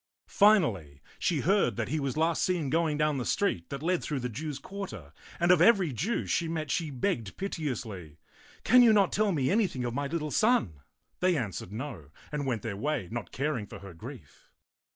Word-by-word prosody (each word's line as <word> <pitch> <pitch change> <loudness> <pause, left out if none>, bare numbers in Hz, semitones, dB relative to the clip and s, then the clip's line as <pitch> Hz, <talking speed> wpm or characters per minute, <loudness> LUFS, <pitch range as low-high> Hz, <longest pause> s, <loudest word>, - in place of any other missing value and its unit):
Finally, 115 - +3 0.2
she - - +1
heard - - +2
that - - -3
he 155 - 0
was 140 0 -2
last 165 +1 +1
seen 170 -7 0
going 160 -2 +1
down 150 -2 +1
the - - -2
street 115 - 0
that 140 +1 -6
led 180 +1 +1
through 145 -3 -3
the 125 - -2
Jews' 145 +5 -5
quarter, 140 - -8 0.3
and 175 +1 +4
of 180 -3 +5
every 185 - +5
Jew 185 - -1
she 170 - 0
met 155 -3 -3
she 165 -3 -1
begged 125 - -2
piteously, 115 - -4 0.2
" - - -25
Can 250 +1 +6
you 235 -2 +7
not 200 -3 +4
tell 210 0 +2
me 140 -5 +1
anything 190 - +1
of 120 - -2
my 140 +2 -2
little 150 0 -3
son?" 135 - +2 0.4
They 180 -2 +2
answered 95 - -4
no, 105 - -6 0.2
and 145 -2 -2
went 120 -5 -1
their 110 -4 -3
way, 135 - -2
not 120 -2 -5
caring 135 -6 -2
for - - -9
her 100 -2 -11
grief. 80 - -12
150 Hz, 200 wpm, -29 LUFS, 115-175 Hz, 0.4 s, you